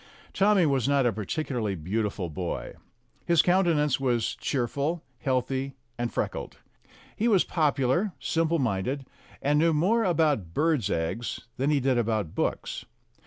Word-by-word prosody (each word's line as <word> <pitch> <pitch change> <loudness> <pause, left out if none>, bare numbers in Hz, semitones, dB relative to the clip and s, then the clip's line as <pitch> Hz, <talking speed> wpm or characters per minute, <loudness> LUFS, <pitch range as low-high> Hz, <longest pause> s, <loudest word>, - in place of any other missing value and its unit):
Tommy 195 -2 +4
was 135 -4 +1
not 140 -2 +3
a 120 - +2
particularly 110 - -2
beautiful 95 +2 -2
boy. 85 +2 -4 0.5
His 170 -1 +4
countenance 170 -7 +3
was 120 -4 0
cheerful, 140 +6 -1 0.2
healthy, 130 +1 -1 0.2
and 120 0 -2
freckled. - - -3 0.6
He 225 - +1
was 200 -6 +5
popular, 150 +4 +1
simple 165 0 +1
minded, 130 +2 -1 0.4
and 145 +1 +3
knew 165 +1 +4
more 200 +10 +2
about 150 - +1
birds' 150 - +2
eggs 85 +9 -2 0.2
than 135 +3 +1
he 150 -2 +3
did 130 -2 +2
about 110 -7 -1
books. - - -2
135 Hz, 135 wpm, -27 LUFS, 115-160 Hz, 0.6 s, was